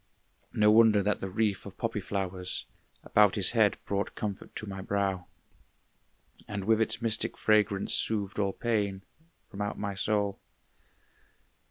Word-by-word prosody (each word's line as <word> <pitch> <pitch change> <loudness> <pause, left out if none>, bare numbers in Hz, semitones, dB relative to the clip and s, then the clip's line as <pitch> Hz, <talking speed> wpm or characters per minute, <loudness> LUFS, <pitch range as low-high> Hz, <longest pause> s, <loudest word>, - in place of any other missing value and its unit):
No 105 0 +4
wonder 110 -2 +5
that 105 +1 0
the 95 - -3
wreath 105 0 0
of 100 - -11
poppy 115 -3 -2
flowers 95 -2 -3 0.4
About 105 -2 +4
his 100 -3 +4
head 110 -4 +3
brought 100 0 -2
comfort 100 -2 -5
to - - -4
my 95 -2 -6
brow, 95 -2 -1 1.2
And 100 -2 -4
with 110 +2 +2
its 110 - -1
mystic 115 -1 +1
fragrance 105 -2 +2
soothed 105 -2 -1
all 100 -1 +1
pain 100 -5 -1 0.5
From 100 -1 -6
out 100 - -3
my 100 -1 -3
soul. 100 0 -1
100 Hz, 145 wpm, -29 LUFS, 95-110 Hz, 1.2 s, wonder